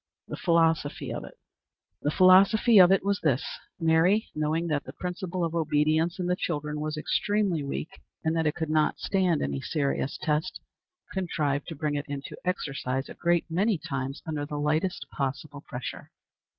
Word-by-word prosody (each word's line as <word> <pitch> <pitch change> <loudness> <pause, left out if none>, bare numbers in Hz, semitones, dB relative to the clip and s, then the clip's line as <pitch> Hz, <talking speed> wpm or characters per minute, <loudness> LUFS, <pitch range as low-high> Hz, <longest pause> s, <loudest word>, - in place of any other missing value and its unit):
The - - -5
Philosophy 165 -4 +1
of - - -5
it. - - -13 0.7
The 145 - 0
philosophy 195 +6 +6
of 180 0 +8
it 195 0 +3
was 200 0 +1
this: 140 -3 +1 0.3
Mary, 165 +6 +3
knowing 155 +2 0
that 150 -4 -1
the 130 - -8
principle 180 +1 -4
of 165 -1 -1
obedience 160 +1 +1
in 180 - -2
the 180 0 +1
children 150 -4 -3
was 155 0 -3
extremely 195 0 0
weak, 140 +3 -5 0.2
and 160 0 +1
that 160 -1 +1
it 150 - 0
could 160 -2 -3
not 155 -1 +2
stand 185 -5 +1
any 70 -1 -2
serious 140 -3 -1
test, 155 +4 -1 0.5
contrived 150 -7 -1
to 165 - -6
bring 150 0 -2
it 145 -1 -3
into 140 -1 -6
exercise 135 -7 -2
a - - -7
great 170 -1 +1
many 190 +5 +1
times 135 -1 -5
under 155 -2 -3
the 145 0 -5
lightest 155 +5 0
possible 140 +1 -4
pressure. 125 -2 -7
160 Hz, 170 wpm, -27 LUFS, 145-180 Hz, 0.7 s, of